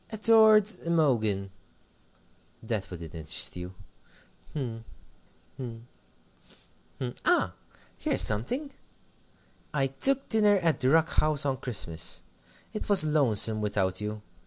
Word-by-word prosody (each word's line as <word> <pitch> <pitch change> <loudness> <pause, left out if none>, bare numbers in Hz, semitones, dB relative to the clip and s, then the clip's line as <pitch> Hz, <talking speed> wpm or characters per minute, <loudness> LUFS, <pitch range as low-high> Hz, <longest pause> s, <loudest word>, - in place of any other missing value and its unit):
"'Adored 220 -1 +5 0.2
Imogen' 115 -12 0 1.1
that 110 -4 -4
wouldn't 85 -3 -10
interest 80 -1 -2
you 90 +1 -7 0.8
hm, 120 -6 -6 0.7
hm, 115 -3 -9 1.1
hm 125 -2 -5
ah, - - +1 0.5
here's - - +2
something! 245 - +1 1.0
'I 135 -2 +1
took 265 - +2
dinner 210 -2 +3
at 165 -4 0
the 130 - +1
Rock 160 +2 +2
House 155 -1 -1
on 135 -2 -1
Christmas. 95 -10 -3 0.5
It 215 - -6
was 200 -4 +8
lonesome 115 -8 +3
without 100 -2 -2
you. 105 0 -6
130 Hz, 110 wpm, -27 LUFS, 105-165 Hz, 1.1 s, was